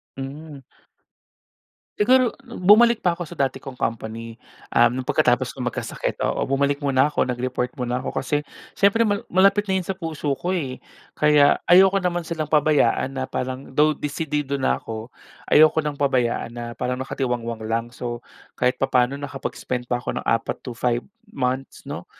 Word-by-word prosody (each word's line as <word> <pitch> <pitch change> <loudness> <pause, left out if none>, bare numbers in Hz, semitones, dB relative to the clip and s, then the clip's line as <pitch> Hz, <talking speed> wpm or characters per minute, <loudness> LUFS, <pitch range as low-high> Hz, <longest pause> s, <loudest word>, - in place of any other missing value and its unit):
Mm. 140 +2 -8 1.4
Siguro 250 +3 +4 0.2
bumalik 230 +1 +5
pa 175 -1 +1
ako 175 - -4
sa 170 - -10
dati 135 -5 -1
kong 135 -2 -9
company, 115 -1 -4 0.3
um, 120 - +4
no'ng - - -12
pagkatapos 125 +1 +2
kong 125 -2 -6
magkasakit, 125 - -3
oo. - - 0
Bumalik 140 +1 +1
muna 140 0 +2
ako, - - 0
nag-report 125 0 -2
muna 125 -2 -2
ako 130 - -4
kasi 145 +2 -1 0.3
siyempre 200 +3 +4
mal 205 -3 +1
malapit 200 +2 +4
na 190 - -1
'yon 190 - +1
sa 190 +1 -4
puso 160 -4 -4
ko 180 +2 -2
eh. 135 -8 -3 0.4
Kaya 150 -1 +5
ayoko 190 +2 +6
naman 175 -2 -1
silang 160 -1 -3
pabayaan 145 -2 +2
na 130 - -1
parang 130 +1 -5
though 150 +1 +3
desidido 145 -2 -2
na - - +2
ako, 110 +1 -7 0.4
ayoko 155 +1 +6
ng 150 -1 -4
pabayaan 125 -4 0
na 120 0 -6
parang 125 +1 -2
nakatiwangwang 120 -4 -3
lang. 115 +1 -2
So, 120 -1 -6 0.3
kahit 125 +1 0
papaano 130 0 +1
nakapag-spent 130 -3 -5
pa 120 - +1
ako 120 - -4
ng - - -15
4 115 - 0
to 115 - -8
5 120 -1 0 0.3
months 130 0 -2
'no, - - -6
135 Hz, 165 wpm, -23 LUFS, 125-160 Hz, 1.4 s, ayoko